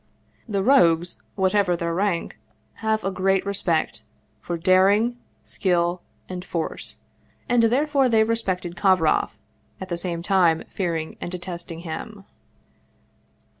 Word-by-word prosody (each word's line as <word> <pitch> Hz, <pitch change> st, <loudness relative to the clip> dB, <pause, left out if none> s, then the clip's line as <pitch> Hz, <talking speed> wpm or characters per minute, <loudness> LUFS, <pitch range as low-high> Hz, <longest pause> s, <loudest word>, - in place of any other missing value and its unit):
The 200 Hz, -2 st, 0 dB
rogues, 175 Hz, -8 st, +3 dB
whatever 190 Hz, -2 st, +2 dB
their 170 Hz, 0 st, -2 dB
rank, 185 Hz, -1 st, -1 dB, 0.4 s
have 220 Hz, -1 st, 0 dB
a 195 Hz, -, -1 dB
great 195 Hz, 0 st, +1 dB
respect 190 Hz, -5 st, -1 dB, 0.3 s
for 175 Hz, -, -4 dB
daring, 200 Hz, +7 st, +3 dB, 0.2 s
skill, 175 Hz, -2 st, 0 dB, 0.3 s
and 180 Hz, -1 st, -6 dB
force 170 Hz, -3 st, -4 dB, 0.5 s
and 245 Hz, -1 st, +3 dB
therefore 270 Hz, +3 st, +3 dB
they 220 Hz, -2 st, +4 dB
respected 190 Hz, -6 st, -1 dB
Kovroff, 185 Hz, -4 st, +2 dB, 0.4 s
at 190 Hz, -, -7 dB
the 175 Hz, -, -2 dB
same 170 Hz, -1 st, -3 dB
time 175 Hz, -4 st, +3 dB
fearing 165 Hz, -4 st, -2 dB
and 175 Hz, -, -4 dB
detesting 175 Hz, -2 st, -6 dB
him. 195 Hz, +5 st, -7 dB
185 Hz, 120 wpm, -24 LUFS, 170-205 Hz, 0.5 s, they